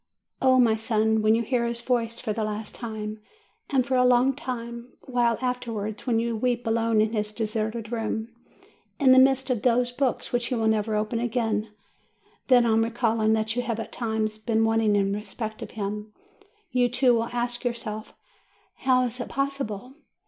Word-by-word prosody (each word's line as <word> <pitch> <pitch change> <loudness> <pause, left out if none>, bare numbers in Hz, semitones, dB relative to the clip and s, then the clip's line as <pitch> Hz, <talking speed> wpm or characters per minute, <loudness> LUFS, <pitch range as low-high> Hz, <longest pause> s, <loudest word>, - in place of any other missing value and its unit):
Oh, 260 -1 +5
my 230 -3 +5
son, 220 -1 +1
when 215 +1 +4
you 230 - 0
hear 235 0 0
his 235 0 -2
voice 235 -2 -1
for 220 -4 -2
the 220 - -2
last 215 0 -4
time, 215 -2 -6 0.5
and 260 -3 +2
for 265 0 0
a 250 - +5
long 250 +2 +4 0.7
while 240 -3 +1
afterwards, 230 -3 -3
when 235 -2 +2
you 230 0 -1
weep 245 +1 -1
alone 225 -1 +2
in 215 +1 0
his 210 -1 -1
deserted 220 +1 -3
room, 225 -1 -2 0.7
in 270 -3 +5
the 260 - +8
midst 265 0 +4
of 240 -4 0
those 245 0 +2
books 255 0 -1
which 240 -1 +1
he 255 - -1
will 225 -1 +1
never 220 0 +1
open 215 +2 -1
again, 225 -3 -1 0.8
then, 245 -2 +6
on 225 -1 +3
recalling 225 -1 +1
that 220 +1 0
you 245 - +1
have 230 -2 -3
at 225 - -6
times 220 -2 -2
been 225 0 +1
wanting 225 -2 +2
in 200 -1 +1
respect 215 +1 -5
to - - -6
him, 210 0 -4 0.6
you, 245 -1 +2
too, 250 +1 +3
will 230 0 0
ask 240 0 -2
yourself, 230 -3 -4 0.6
"How 255 -1 +3
is 245 +1 -5
it 245 - -4
possible?' 270 -4 -3
230 Hz, 180 wpm, -26 LUFS, 220-245 Hz, 0.8 s, the